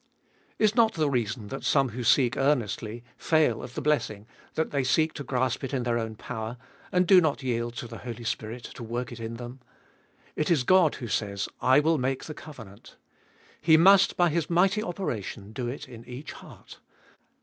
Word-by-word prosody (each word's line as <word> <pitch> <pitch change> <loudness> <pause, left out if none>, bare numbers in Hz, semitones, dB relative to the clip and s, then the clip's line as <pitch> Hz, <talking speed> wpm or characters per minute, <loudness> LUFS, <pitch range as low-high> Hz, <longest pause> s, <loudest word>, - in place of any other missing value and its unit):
2. - - -1
Is 215 -1 +4
not 225 -2 +4
the 155 -3 +1
reason 115 -3 -2
that 135 - -6
some 135 -3 +3
who 120 +2 -5
seek 125 0 +4
earnestly, 120 -4 -1 0.2
fail 155 -8 +2
of 125 - -9
the 155 - -4
blessing, 110 -8 0 0.3
that 160 - -1
they 140 -2 0
seek 155 +5 +2
to 145 - -6
grasp 130 0 -1
it 135 +1 -3
in 125 - -1
their 120 -1 0
own 110 -1 -4
power, 115 +1 -6 0.3
and 180 0 +3
do 185 +1 +7
not 150 -4 0
yield 120 -1 -2
to 120 - -5
the 115 0 -9
Holy 120 -1 -7
Spirit 115 +1 -4
to - - -10
work 120 +1 -4
it 120 - -8
in 115 0 -5
them. 120 +2 -8 0.8
It 155 - -1
is 160 -7 +3
God 180 +1 +4
who 120 - -6
says, 100 -2 -2
I 130 +3 +5
will 160 0 +2
make 130 +1 -1
the 155 - -7
covenant. 115 -11 -12 0.7
He 160 0 +6
must 190 +3 +6
by 175 -1 +4
His 165 0 -1
mighty 190 +5 +3
operation 115 - -5
do 120 +1 -3
It 135 +4 -6
in 120 -2 -11
each 125 +4 -8
heart. - - -13
130 Hz, 200 wpm, -27 LUFS, 115-155 Hz, 0.8 s, do